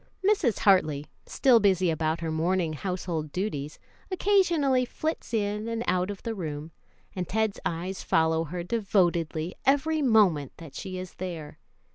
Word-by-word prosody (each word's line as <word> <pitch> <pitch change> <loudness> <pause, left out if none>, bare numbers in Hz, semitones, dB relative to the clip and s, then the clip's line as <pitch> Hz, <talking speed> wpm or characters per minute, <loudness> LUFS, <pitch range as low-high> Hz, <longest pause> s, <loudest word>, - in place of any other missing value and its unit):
Mrs. 355 - +2
Hartley, 155 -8 +3 0.2
still 250 -4 +4
busy 190 -4 +3
about 160 +1 -1
her 165 -1 -2
morning 165 +1 0
household 170 -2 -3
duties, 150 -6 -3 0.3
occasionally 345 -9 +3
flits 310 +4 -4
in 210 -1 -1
and 230 0 -2
out 180 +1 +1
of 200 -2 -6
the 230 - -2
room, 155 -5 -5 0.4
and 180 -2 -3
Ted's 220 0 0
eyes 180 +3 -4
follow 160 0 +2
her 175 +3 -5
devotedly 175 -5 0
every 295 +3 +2
moment 200 - +3
that 160 -5 -11
she 185 +5 -6
is 185 0 -7
there. 170 -5 -6
185 Hz, 145 wpm, -27 LUFS, 160-225 Hz, 0.4 s, still